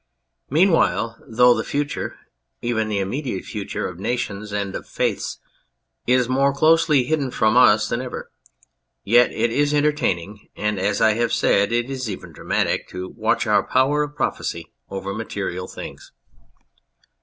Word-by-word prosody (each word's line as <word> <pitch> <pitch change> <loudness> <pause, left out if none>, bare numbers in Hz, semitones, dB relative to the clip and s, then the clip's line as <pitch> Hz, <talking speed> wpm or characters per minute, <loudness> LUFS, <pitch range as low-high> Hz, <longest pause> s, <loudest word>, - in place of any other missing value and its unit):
Meanwhile, 125 - +2
though 125 +2 +5
the 110 -1 -2
future, 145 0 -3 0.4
even 115 -2 -1
the 105 - -1
immediate 100 +2 -3
future, 105 -3 -4
of 90 -1 -9
nations 105 -2 -3
and 100 -1 -2
of - - -6
faiths - - -2 0.7
is 125 -1 +3
more 135 +2 +2
closely 155 -1 +4
hidden 140 0 -1
from 110 -2 +2
us 110 -4 +6
than 115 - -2
ever, 130 -1 -7 0.7
yet 120 +4 +5
it 115 +1 0
is 145 +3 +1
entertaining, 110 - -1
and, 105 -2 -1
as 100 +2 0
I 110 - +5
have 115 +1 0
said, 100 +1 +2
it 120 +1 +1
is 130 -3 -4
even 95 - -7
dramatic, - - -1
to 90 0 -6
watch - - 0
our - - +4
power 135 +3 +2
of 145 0 -4
prophecy - - -3 0.2
over 100 0 -4
material 100 -4 -4
things. - - -9
115 Hz, 150 wpm, -22 LUFS, 100-135 Hz, 0.7 s, us